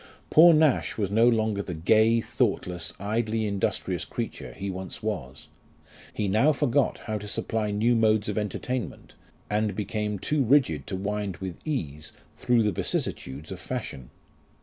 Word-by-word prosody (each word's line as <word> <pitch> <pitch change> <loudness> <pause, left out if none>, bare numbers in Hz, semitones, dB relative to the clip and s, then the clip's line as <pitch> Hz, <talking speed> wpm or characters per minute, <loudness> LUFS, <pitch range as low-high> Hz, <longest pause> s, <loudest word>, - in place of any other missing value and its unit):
Poor 170 +2 +9
Nash 155 -3 +3
was 100 -3 -1
no 115 +3 +5
longer 110 -3 +1
the 90 -3 -5
gay, 110 +7 +4
thoughtless, 90 -5 -1
idly 110 +2 -1
industrious 100 -2 -1
creature 60 - -5
he 95 +9 -6
once 95 +3 -6
was; 90 -13 -4 0.6
he 105 - -2
now 110 +10 +4
forgot 140 -2 +1
how 110 -2 -2
to 105 - -8
supply 110 0 -1
new 110 +4 +2
modes 110 -2 +3
of 105 - -2
entertainment, 110 +1 -4 0.3
and 105 -1 0
became 105 0 -2
too 150 +9 0
rigid 120 - +2
to - - -3
wind 100 -1 -3
with 95 -2 -6
ease 75 - -3 0.2
through 120 -2 +2
the 105 - +2
vicissitudes 70 -4 -3
of 95 - -6
fashion. 90 - -6
105 Hz, 150 wpm, -26 LUFS, 95-115 Hz, 0.6 s, Poor